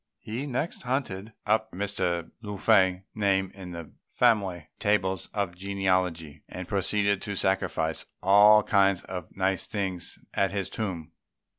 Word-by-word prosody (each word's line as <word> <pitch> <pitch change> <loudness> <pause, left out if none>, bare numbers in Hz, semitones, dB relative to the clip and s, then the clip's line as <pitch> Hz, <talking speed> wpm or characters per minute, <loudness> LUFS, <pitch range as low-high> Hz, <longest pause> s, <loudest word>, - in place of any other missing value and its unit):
He 120 +7 -5
next 140 +5 -3
hunted 115 -5 -3
up 110 +1 +1
Mr. 90 -3 -2
Lung 105 -3 -6
fei's 95 -3 +4
name 95 -2 +1
in 95 -2 -9
the 85 -3 -8 0.2
family 100 -9 +2
tables 95 -4 +1
of 100 -4 -2
genealogy, 95 -5 -1
and 90 -1 -7
proceeded 100 0 +1
to 100 - -4
sacrifice 85 -4 0
all 105 +3 +7
kinds 100 -3 +3
of 90 -1 -8
nice 95 0 0
things 95 -4 -3 0.2
at 100 - +2
his 100 -1 -3
tomb. 85 -7 -4
95 Hz, 135 wpm, -27 LUFS, 90-105 Hz, 0.2 s, all